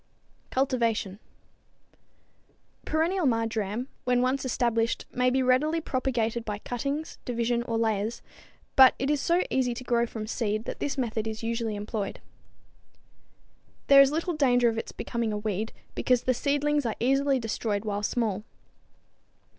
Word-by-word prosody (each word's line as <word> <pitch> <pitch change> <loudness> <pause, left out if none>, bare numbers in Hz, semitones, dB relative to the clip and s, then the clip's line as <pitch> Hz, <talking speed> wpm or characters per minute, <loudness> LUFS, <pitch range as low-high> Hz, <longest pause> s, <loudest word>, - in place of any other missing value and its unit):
Cultivation. 230 -7 0 1.7
Perennial 330 +2 +1
marjoram 225 0 -1 0.2
when 250 0 +2
once 260 +2 0
established 235 -3 0
may 250 0 +2
be 260 +1 +1
readily 285 +6 +2
propagated 240 -5 -1
by 210 -2 -4
cuttings, 275 +8 -4
division 235 -1 0
or 230 -1 -2
layers, 220 0 -1 0.5
but 265 -2 +8
it 270 +2 0
is 295 -2 +1
so 345 +2 +2
easy 250 -2 +1
to 255 - -7
grow 235 -1 +1
from 220 -2 -6
seed 215 -1 -2
that - - -5
this 290 0 -2
method 225 -3 -1
is 220 0 -5
usually 230 -1 -2
employed. 205 0 -4 1.7
There 275 0 +10
is 275 - +6
little 335 +3 -1
danger 245 -5 +3
of 225 - -3
its - - -6
becoming 235 -2 -3
a 210 - -2
weed, 210 +1 -2 0.2
because 250 -2 +1
the 255 - +2
seedlings 290 +3 +1
are 225 -3 -2
easily 275 +2 +2
destroyed 220 -3 -2
while 205 -1 -2
small. 210 -2 -1
240 Hz, 145 wpm, -27 LUFS, 225-265 Hz, 1.7 s, There